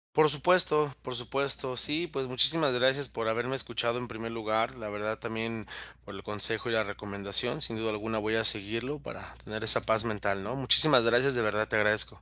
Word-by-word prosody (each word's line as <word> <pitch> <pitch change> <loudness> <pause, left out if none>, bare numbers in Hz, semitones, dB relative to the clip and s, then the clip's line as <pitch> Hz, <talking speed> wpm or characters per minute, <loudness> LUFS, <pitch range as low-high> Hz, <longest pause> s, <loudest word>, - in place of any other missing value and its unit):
Por 155 0 +4
supuesto 150 -1 +3
por 125 - -8
supuesto, 135 +1 0
sí, 150 +7 +1
pues 135 -5 -6
muchísimas 140 +4 +3
gracias 130 +2 0
por 115 - -6
haberme 120 +4 -3
escuchado, 120 -2 -3
en 125 0 -7
primer 115 -1 -8
lugar, 110 +1 -3
la 110 -4 -9
verdad 105 +1 -5
también 115 -1 -6 0.4
por 100 - -12
el 95 - -10
consejo 105 +2 -2
y - - -2
la 110 -1 0
recomendación, 100 +6 -6
sin 115 - -1
duda 110 0 -4
alguna, 110 +1 -4
voy 110 +1 -3
a 115 - -1
seguirlo 115 +7 -1
para - - -12
tener 110 - -8
esa 110 - +5
paz 110 -1 0
mental, 100 -3 -4
¿no?, 120 +5 -6
muchísimas 135 0 +8
gracias, 120 +4 +3
de 120 - +2
verdad 105 0 -2
te - - -2
agradezco. 105 0 0
115 Hz, 200 wpm, -27 LUFS, 110-130 Hz, 0.4 s, muchísimas